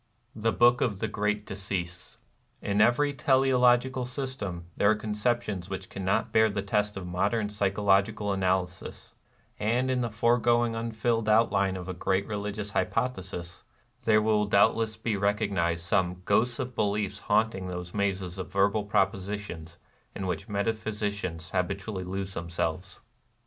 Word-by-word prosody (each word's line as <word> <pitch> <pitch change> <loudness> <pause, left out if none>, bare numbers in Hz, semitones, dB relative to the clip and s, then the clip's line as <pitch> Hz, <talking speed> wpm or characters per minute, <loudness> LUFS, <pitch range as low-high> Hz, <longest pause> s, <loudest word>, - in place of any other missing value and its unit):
The 115 +1 +1
Book 120 +1 +4
of 105 -6 +1
the 110 - -2
Great 105 0 -1
Decease. 95 -2 -5 0.4
In 100 +1 0
every 145 +6 +3
teleological 130 -1 +3
system 125 - -5
there 100 - +3
are 110 - +4
con 105 0 -4
ceptions 105 -4 -1
which 95 -1 -6
cannot 95 0 -1
bear 110 0 +5
the 100 -1 -3
test 105 0 0
of 95 - -5
modern 100 +5 0
psychological 100 0 +1
analysis, 95 -1 -2 0.5
and 125 +5 +1
in 125 -1 +1
the 120 - -1
foregoing 120 +1 +2
unfilled 115 0 -1
outline 100 -3 +3
of 90 -1 -7
a 95 - -3
great 95 +2 0
religious 105 -1 -4
hypo 115 +4 +1
thesis 90 -6 -8 0.4
there 110 -1 +4
wiU 105 -1 +2
doubtless 110 +2 +3
be 110 -1 -1
recognized 100 -5 0
some 90 +1 0
"ghosts 115 +4 +2
of 125 -1 -4
beliefs 100 -1 -1
haunting 105 -3 +2
those 90 -1 -6
mazes 95 -2 -2
of 95 - -6
verbal 100 +2 +2
propositions 95 -4 -2 0.4
in 95 - -4
which 95 +4 -3
metaphysicians 105 -5 -2
habitually 95 +1 -2
lose 95 +1 -4
themselves." 85 +1 -3
105 Hz, 145 wpm, -28 LUFS, 95-110 Hz, 0.5 s, bear